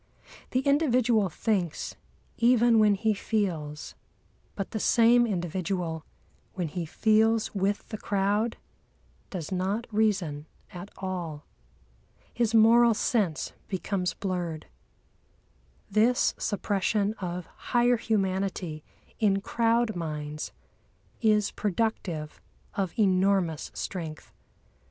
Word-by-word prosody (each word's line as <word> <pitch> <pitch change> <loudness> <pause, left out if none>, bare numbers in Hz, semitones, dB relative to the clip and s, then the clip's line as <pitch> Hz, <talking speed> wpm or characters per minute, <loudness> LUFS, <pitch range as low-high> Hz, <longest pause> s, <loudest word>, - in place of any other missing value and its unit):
The 255 - +1
individual 250 - +3
thinks, 180 -2 -2 0.4
even 235 -1 +5
when 210 -1 +5
he 220 +2 +1
feels; 175 -9 -2 0.6
but 195 - -4
the 220 - -2
same 235 +2 +5
individual, 175 -3 -2 0.5
when 175 -4 -2
he 170 +1 -4
feels 220 +4 +2
with 200 0 -1
the 215 - -5
crowd, 205 +3 0 0.7
does 175 -4 -5
not 190 +5 -1
reason 190 -9 0 0.3
at 180 +3 -8
all. 175 -6 -5 0.9
His 230 -1 +1
moral 230 +1 +6
sense 200 -8 0
becomes 190 -1 -2
blurred. 175 -5 -3 1.3
This 225 +4 +3
suppression 205 0 0
of 180 -2 -4
higher 245 +5 +1
humanity 190 -7 -1 0.4
in 200 -3 +3
crowd 230 +1 +1
minds 150 -2 -4 0.7
is 210 -3 +3
productive 185 -7 -2 0.3
of 190 -3 -3
enormous 190 -5 +2
strength. 160 -5 -6
200 Hz, 95 wpm, -28 LUFS, 175-225 Hz, 1.3 s, moral